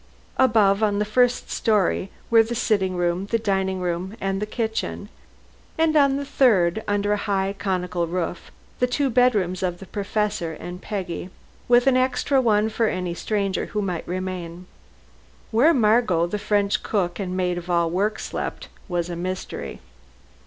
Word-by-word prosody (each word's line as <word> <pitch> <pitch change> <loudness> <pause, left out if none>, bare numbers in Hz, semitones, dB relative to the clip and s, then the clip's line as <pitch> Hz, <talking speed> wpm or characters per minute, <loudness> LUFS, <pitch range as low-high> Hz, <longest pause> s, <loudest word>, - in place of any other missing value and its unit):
Above, 215 -5 +4
on 205 -2 +2
the 210 - +1
first 245 +3 +1
story, 205 -3 +1 0.2
were 230 -1 +7
the 230 +2 -2
sitting 200 -5 +1
room, 175 +2 -1
the 230 - +1
dining 190 -3 -1
room 180 +4 -3
and 195 0 -2
the 210 - -2
kitchen; 220 0 -3 0.7
and 320 -1 +2
on 280 -2 +4
the 285 - -4
third, 220 -8 +3
under 205 0 +1
a - - +1
high 195 -1 -1
conical 180 -3 -1
roof, 175 0 -4 0.3
the 250 - +3
two 270 +1 0
bedrooms 210 -8 +2
of 180 -2 -1
the 195 - -10
Professor 205 -4 -2
and 180 +3 -8
Peggy, 185 -4 -4 0.4
with 245 +1 +5
an 270 -1 +4
extra 260 +1 +2
one 215 -3 +3
for 220 +1 0
any 180 -3 -2
stranger 200 +1 -1
who 210 - -2
might 180 -4 -3
remain. 180 -1 -5 0.9
Where 245 +9 +5
Margot, 215 - +3
the 205 +4 -3
French 205 -1 +1
cook 185 -4 -1
and 185 -2 -3
maid 180 -1 0
of 175 +1 -11
all 170 -1 +2
work, 205 +4 0
slept, - - -5 0.2
was 175 -3 -1
a 175 - -5
mystery. 185 +2 -5
200 Hz, 165 wpm, -23 LUFS, 180-225 Hz, 0.9 s, were